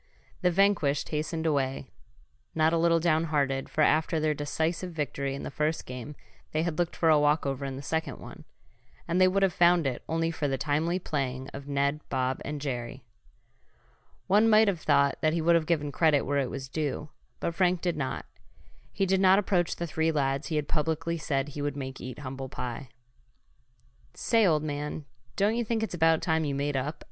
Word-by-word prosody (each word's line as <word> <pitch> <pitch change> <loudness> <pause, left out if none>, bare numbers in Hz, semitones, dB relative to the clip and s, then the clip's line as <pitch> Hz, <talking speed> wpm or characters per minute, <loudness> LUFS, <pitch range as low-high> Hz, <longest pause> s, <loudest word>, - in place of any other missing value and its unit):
The 180 - +3
vanquished 175 -6 +2
hastened 160 +1 -2
away, 135 -3 -1 0.6
not 160 +1 +3
a - - +3
little 165 0 +3
down 165 -1 +2
hearted, 140 -4 0
for 155 - -1
after 155 +2 +3
their 155 0 +1
decisive 160 +4 -2
victory 140 -2 -2
in - - -7
the - - -5
first 155 +4 -1
game 125 +3 -7 0.4
they 155 +1 +1
had 170 -2 -2
looked 175 -1 0
for 165 - +2
a 155 -1 +6
walkover 145 -2 +1
in 135 -1 -4
the 135 - -7
second 160 +3 -2
one. - - -11 0.6
And 175 +2 +1
they 185 - +7
would 195 +1 +2
have 190 -2 +3
found 175 -2 +4
it 130 -2 -2
only 165 0 0
for 155 -3 -2
the 135 -1 -1
timely 155 +6 0
playing 135 -6 -3
of 140 0 -9
Ned, 140 +1 0
Bob 130 0 -1
and 150 0 -4
Jerry. 130 -2 -5 1.2
One 210 +4 +4
might 215 0 +6
have 180 -5 0
thought 140 0 +2
that 155 0 +2
he 170 - 0
would 170 +2 +4
have 165 -2 +2
given 150 -4 0
credit 155 -2 +3
where 145 +1 0
it 130 -3 -1
was 135 -1 -6
due, 150 +1 -3 0.3
but 170 - -2
Frank 180 0 +2
did 175 -2 0
not. 135 -3 -3 0.7
He 195 - 0
did 190 0 +2
not 190 0 +6
approach 185 -4 +1
the 170 - -3
three 160 0 0
lads 135 -1 0
he 160 - -3
had 150 -1 -1
publicly 160 +2 -1
said 140 -2 -1
he 145 0 -6
would 145 -1 -2
make 135 -1 -6
eat 125 -1 -7
humble 135 -1 -6
pie. 125 +1 -6 1.3
"Say, 225 -3 +3
old 155 -3 +2
man, 150 0 -4 0.3
don't 205 +3 +2
you 240 - 0
think 225 0 -1
it's 220 - -3
about 165 -1 +3
time 160 -1 +1
you 140 -2 -2
made 140 +1 -1
up?" 140 +4 -2
155 Hz, 200 wpm, -28 LUFS, 140-170 Hz, 1.3 s, they